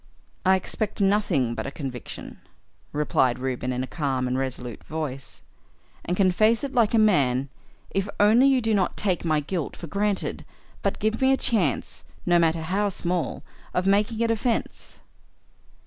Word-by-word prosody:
"I 190 0 +5
expect 210 +3 -3
nothing 195 - +2
but - - -4
a - - -4
conviction," 130 -5 -7 0.5
replied 135 -4 +1
Reuben 130 -1 -2
in 125 0 -2
a - - -2
calm 130 -3 -1
and 125 - -1
resolute 130 -3 -4
voice, 150 -4 -5 0.6
"and 180 - -2
can 190 -2 +4
face 220 +6 +3
it 280 0 -3
like 235 -3 +3
a - - +5
man 140 - +3 0.4
if 195 +1 -1
only 225 +6 +6
you 265 -2 +4
do 225 -1 +1
not 190 -4 +1
take 185 -5 0
my 155 -3 +1
guilt 160 +1 -3
for - - -7
granted, 200 +4 -1 0.4
but - - -1
give 220 +3 -1
me 265 0 +5
a 270 - +4
chance, 180 - 0 0.2
no 175 -1 +4
matter 165 -1 +2
how 200 +5 0
small, 175 -2 -2 0.3
of 180 - +1
making 210 +4 +2
a - - +2
defence." 230 +1 -2
180 Hz, 165 wpm, -25 LUFS, 140-210 Hz, 0.6 s, only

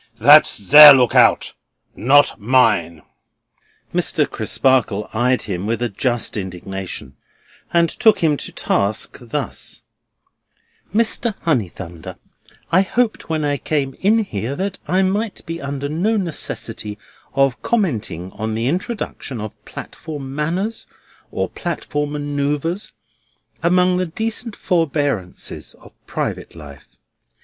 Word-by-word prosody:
That's - - +6
their 145 +7 +10
look 125 -3 +3
out: - - +4 0.4
not 140 +3 +4
mine." 100 -9 +2 0.9
Mr. - - +1
Crisparkle 120 -6 +1
eyed 125 +3 +1
him 95 -1 -4
with 115 0 -1
a 120 - 0
just 120 +3 0
indignation, 95 -6 -6 0.6
and 170 -1 +3
took 220 +4 +3
him 155 -2 +3
to - - -2
task 100 +2 -1
thus: 130 +4 -4 1.1
"Mr. 225 +1 +1
Honeythunder, 95 - -3 0.5
I 185 - +5
hoped 225 +2 -1
when 155 -2 -1
I 145 -1 0
came 140 -2 -2
in 220 +3 +3
here 120 - -4
that 195 +3 -3
I 185 +2 +2
might 205 +2 -2
be 165 0 -5
under 140 0 -4
no 185 +10 0
necessity 115 - -4 0.4
of 135 -3 +2
commenting 110 - -2
on 110 +1 -4
the 115 +1 -2
introduction 175 - -3
of 105 -1 -6
platform 145 -4 -8
manners 175 +10 -3 0.4
or - - -2
platform 150 -3 -4
manœuvres 145 +5 -2 0.7
among 180 +1 +3
the 185 0 -1
decent 225 +5 -3
forbearances 145 - -2
of - - -18
private - - -4
life. 70 -3 -12
145 Hz, 120 wpm, -19 LUFS, 110-180 Hz, 1.1 s, their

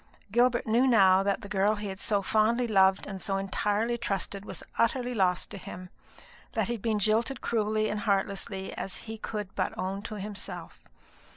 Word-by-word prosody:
Gilbert 240 +2 +3
knew 235 +4 +3
now 195 -6 +6
that 200 +3 0
the 200 - -8
girl 205 +1 +2
he 205 -1 -5
had 190 0 -6
so 200 -1 0
fondly 225 +4 +2
loved 190 -3 +4
and 195 -2 -6
so 195 -1 -1
entirely 210 +4 0
trusted 200 -2 -2
was - - -8 0.2
utterly 245 +2 +1
lost 185 -5 +1
to 200 - -6
him; 180 0 -9 0.6
that - - +1
he 240 - -2
had 230 - -6
been 220 -1 +1
jilted 220 +5 +1
cruelly 215 -1 0
and 210 0 -2
heartlessly, 195 -1 -1
as 195 - -4
he 225 0 -5
could 210 -3 -5
but - - -2
own 190 +2 -2
to 215 +1 -6
himself. 205 0 -7
210 Hz, 185 wpm, -29 LUFS, 195-225 Hz, 0.6 s, now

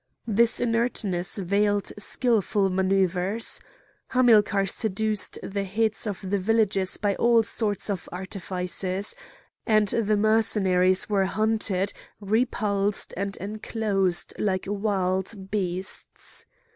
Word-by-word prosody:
This 230 +1 +2
inertness 230 -7 0
veiled 200 +2 0
skilful 210 -2 +1
manouvres. 190 +2 +1 0.5
Hamilcar 215 -5 +3
seduced 215 +1 0
the 200 0 -3
heads 220 +3 -1
of 195 -2 -5
the 200 +1 0
villages 195 -2 +1
by 205 -1 0
all 235 -1 +4
sorts 210 -2 +1
of 195 -4 -4
artifices; 185 +1 -3 0.5
and 215 -3 +3
the 215 -1 +1
Mercenaries 200 -4 +3
were 200 -2 +1
hunted, 210 -2 0 0.3
repulsed, 205 -2 -1
and 195 +1 -3
enclosed 200 -3 -1
like 190 -3 -1
wild 195 -1 -2
beasts. 190 -2 -3
200 Hz, 100 wpm, -25 LUFS, 190-220 Hz, 0.5 s, all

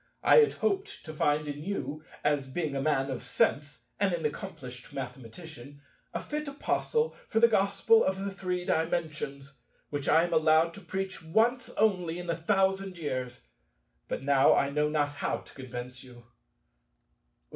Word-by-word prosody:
I - - +7
had 450 -2 +6
hoped 405 -1 -2
to 155 - -7
find 150 0 +1
in 145 0 -5
you—as 150 -6 -3
being 150 0 -2
a 135 - -1
man 135 -2 +1
of 130 - -4
sense 130 0 0
and 195 -3 +2
an 165 -2 -5
accomplished 125 -4 -6
mathematician—a 140 +2 -9
fit 300 0 -4
apostle 460 +11 -1
for 225 - +1
the 235 - +7
Gospel 220 - +4
of 190 - 0
the 195 +1 -3
Three 180 -2 -3
Dimensions, 150 -5 -2 0.3
which 145 -2 -2
I 160 +2 +5
am 175 0 -2
allowed 160 +1 +4
to 200 - -11
preach 190 +1 -4
once 225 +10 +1
only 180 -6 +1
in 180 0 -7
a - - -1
thousand 190 +1 +1
years: 130 -6 -4 0.7
but - - -4
now 140 0 +5
I 140 - +1
know 150 +1 +1
not 150 -1 +1
how 145 - -2
to - - -15
convince 125 -1 -8
you. 120 -2 -14
155 Hz, 155 wpm, -29 LUFS, 140-195 Hz, 0.7 s, I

